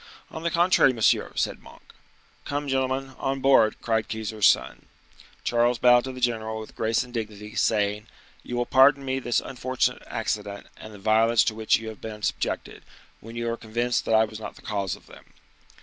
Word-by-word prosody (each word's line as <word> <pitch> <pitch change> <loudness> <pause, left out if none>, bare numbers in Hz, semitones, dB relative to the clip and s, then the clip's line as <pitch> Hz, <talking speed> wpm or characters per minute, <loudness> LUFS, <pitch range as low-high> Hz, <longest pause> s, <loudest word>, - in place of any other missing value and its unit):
"On 160 - -7
the 170 - 0
contrary, 170 -6 +4
monsieur," 115 -3 +2
said - - -1
Monk. - - -17 0.5
"Come, 145 0 -3
gentlemen, 130 0 -1
on 135 0 -1
board," 130 -5 +4
cried 110 -2 0
Keyser's 110 -1 +1
son. - - +1 0.6
Charles 120 0 +2
bowed 125 +1 +5
to 130 - -4
the 130 - -9
general 110 -3 -1
with 110 - -10
grace 115 0 +1
and 125 -1 -14
dignity, 105 -2 -6
saying,—"You 105 +2 -2
will 120 - 0
pardon 135 +2 +5
me 130 0 -1
this 120 -2 0
unfortunate 130 0 -2
accident, 100 0 -4
and 110 - -11
the 105 - -11
violence 110 +2 +3
to 110 - 0
which 110 0 +2
you 110 0 -7
have 110 - -11
been 105 -1 -8
subjected, - - -3 0.4
when 115 +1 -11
you 120 0 -3
are 115 - -3
convinced 120 +2 -1
that 110 - +2
I 110 0 +5
was 110 0 -9
not 110 - -8
the - - -17
cause 100 -4 -2
of - - -19
them." - - -15
115 Hz, 190 wpm, -25 LUFS, 110-130 Hz, 0.6 s, bowed